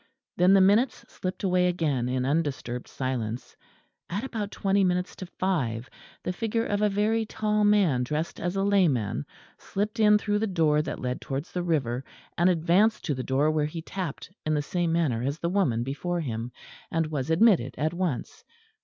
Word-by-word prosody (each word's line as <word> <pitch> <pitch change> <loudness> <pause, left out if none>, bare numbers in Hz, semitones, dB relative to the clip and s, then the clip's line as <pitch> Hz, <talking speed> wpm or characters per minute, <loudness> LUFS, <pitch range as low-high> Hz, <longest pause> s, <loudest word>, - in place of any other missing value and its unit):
Then 180 +2 +5
the 195 - +6
minutes 210 +7 +3
slipped 185 +1 -5
away 180 -1 +3
again 150 -9 0
in 130 0 0
undisturbed 135 -5 -1
silence. 125 -3 -4 0.5
At 200 +6 -2
about 220 -6 -3
twenty 195 -1 +1
minutes 180 0 0
to 185 - -7
five 135 -12 -2 0.3
the 180 - -2
figure 225 +4 -1
of 205 0 -1
a 210 - +4
very 215 +3 +1
tall 210 -1 0
man 200 -11 +4
dressed 150 +6 -2
as 175 +2 -2
a 195 - +1
layman 150 - +2 0.3
slipped 210 +3 -3
in 210 -1 +6
through 210 0 0
the 220 - 0
door 160 -5 +2
that - - -4
led 125 0 -3
towards 140 +2 -4
the 180 - -2
river, 135 -8 0 0.3
and 175 +2 +4
advanced 180 +6 +3
to 150 - 0
the 130 - -3
door 135 +4 +2
where 150 -1 +1
he 160 +1 -6
tapped 180 -2 -5
in 155 0 0
the 145 - 0
same 175 +1 -1
manner 155 -9 +1
as 140 +4 -1
the 170 - -2
woman 145 - +1
before 170 +7 -2
him, 120 -4 -4 0.4
and 165 -1 0
was 145 -1 -2
admitted 165 - +4
at 155 +3 0
once. 185 - -3
170 Hz, 185 wpm, -27 LUFS, 135-195 Hz, 0.5 s, the